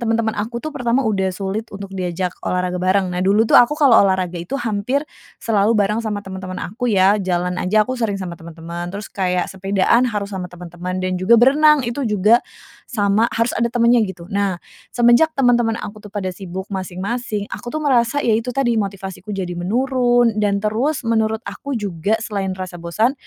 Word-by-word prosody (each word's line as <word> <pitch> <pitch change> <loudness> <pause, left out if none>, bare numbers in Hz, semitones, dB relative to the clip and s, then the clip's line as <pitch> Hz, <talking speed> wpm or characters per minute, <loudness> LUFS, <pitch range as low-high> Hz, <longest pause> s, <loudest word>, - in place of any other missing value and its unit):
teman-teman 225 -1 0
aku 235 +5 -4
tuh, 310 - -4
pertama 245 0 0
udah 195 -4 +1
sulit 195 +4 -4
untuk 200 -1 -9
diajak 180 -1 -2
olahraga 180 0 -2
bareng. 185 0 +1
Nah, 180 - -2
dulu 200 +4 +3
tuh - - -2
aku 270 +5 +2
kalau 285 -5 +4
olahraga 185 -3 +1
itu 175 +11 -4
hampir 240 +4 -1 0.3
selalu 215 0 +1
bareng 210 +2 +1
sama 210 -3 -4
teman-teman 185 -1 -7
aku 220 +10 -3
ya, 200 0 +4
jalan 180 -1 -1
aja, 215 +3 +3
aku 255 - -4
sering 210 -4 0
sama 185 -3 -5
teman-teman. 170 +1 -7
Terus, 200 +3 -7
kayak 180 -2 0
sepedaan 195 +6 +2
harus 205 -2 -4
sama 185 -2 -4
teman-teman, 180 +1 -6
dan 185 -1 -2
juga, 220 +6 +5
berenang, 285 +4 +5
itu 235 +4 -3
juga, 210 +3 +4 0.5
sama 210 0 +2
harus 230 +1 0
ada 235 - 0
temannya, 235 -2 +3
gitu. 180 -2 -8
Nah, 200 -2 0 0.3
semenjak 240 +6 +4
teman-teman 240 -3 +3
aku 210 0 -8
tuh, 210 - -11
pada 195 -2 -4
sibuk 190 0 -7
masing-masing, 200 +4 -3
aku 240 - -6
tuh 310 +3 -3
merasa, 260 0 +2
ya 230 - +3
itu 225 +3 0
tadi, 260 -3 +2
motivasiku 195 0 -5
jadi 180 -2 -3
menurun, 240 +5 +2
dan 200 -1 0
terus, 245 +8 0
menurut 220 0 0
aku 280 -2 -5
juga 200 -1 -1
selain 195 -3 -3
rasa 185 -2 -7
bosan. 215 +9 +1
205 Hz, 185 wpm, -20 LUFS, 185-235 Hz, 0.5 s, juga